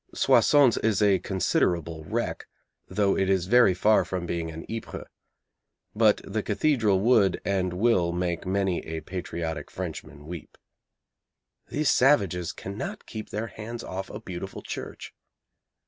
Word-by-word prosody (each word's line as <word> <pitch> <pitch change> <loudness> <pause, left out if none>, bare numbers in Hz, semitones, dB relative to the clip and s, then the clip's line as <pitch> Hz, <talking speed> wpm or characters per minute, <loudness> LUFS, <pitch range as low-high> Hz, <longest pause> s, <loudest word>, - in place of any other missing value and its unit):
Soissons 140 -6 +5
is 110 -3 +1
a 100 -3 +4
considerable 85 -4 0
wreck, - - -3 0.4
though 100 -2 +1
it 95 0 +1
is 95 -2 +2
very 110 -2 +5
far 105 +4 +4
from 90 -2 -4
being 85 -1 -3
an 80 0 -8
Ypres. 115 0 -6 0.9
But 110 -1 +3
the 110 +2 -2
cathedral 110 -3 +2
would, 110 -4 +4
and 95 -2 0
will, 95 -3 +2
make 85 -1 -2
many 95 -1 0
a 80 0 -4
patriotic 85 -4 -5
Frenchman 75 -1 -7
weep. 85 0 -9 1.1
These 150 -1 +1
savages 100 - +3
cannot 110 - -6
keep 110 -1 -7
their 105 +2 -3
hands 115 +1 -7
off 95 +1 -5
a - - -7
beautiful 95 +1 -7
church. - - -7
95 Hz, 135 wpm, -26 LUFS, 85-110 Hz, 1.1 s, Soissons